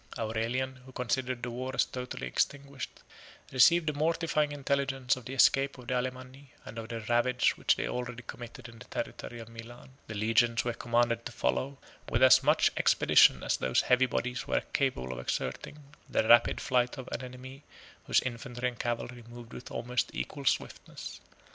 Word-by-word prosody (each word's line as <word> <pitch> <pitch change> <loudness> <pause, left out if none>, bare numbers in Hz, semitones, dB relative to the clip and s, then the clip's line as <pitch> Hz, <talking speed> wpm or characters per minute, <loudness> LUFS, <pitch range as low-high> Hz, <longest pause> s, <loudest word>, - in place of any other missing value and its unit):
32 - - -4
Aurelian, 125 +4 -1
who 130 +1 -15
considered 125 0 -2
the 120 - -3
war 130 +2 -4
as - - +3
totally 125 -1 -6
extinguished, 140 -1 -3 0.5
received 165 +6 +6
the 150 - 0
mortifying 155 0 +1
intelligence 135 -2 0
of 130 -3 -11
the 130 - -6
escape 135 +1 +4
of 125 - -12
the 130 - -2
Alemanni, 130 +2 -4 0.2
and 115 - -7
of 110 0 -7
the 115 -1 -4
ravage 120 +3 +2
which - - +2
they - - -2
already 125 0 -4
committed 120 0 -9
in 115 -1 -14
the - - -11
territory 120 - -6
of 115 - -9
Milan. 115 +2 -11 0.2
The 110 - -6
legions 115 +3 +2
were 120 - 0
commanded 115 0 +1
to - - -10
follow, 130 - -1 0.3
with - - +2
as - - +8
much - - +4
expedition - - +5
as - - +1
those 65 - +2
heavy 130 +1 +3
bodies 125 0 -2
were - - +1
capable 125 - 0
of 60 - -7
exerting, 60 - -4 0.3
the 110 - +1
rapid 120 +1 +6
flight 125 +1 +1
of 130 - -7
an - - -3
enemy 130 +2 -9 0.5
whose - - +4
infantry 125 0 -3
and 120 - -13
cavalry 120 0 -3
moved 120 0 -11
with 125 - -9
almost 125 +1 -1
equal 60 - -5
swiftness. - - -2
125 Hz, 180 wpm, -30 LUFS, 120-130 Hz, 0.5 s, as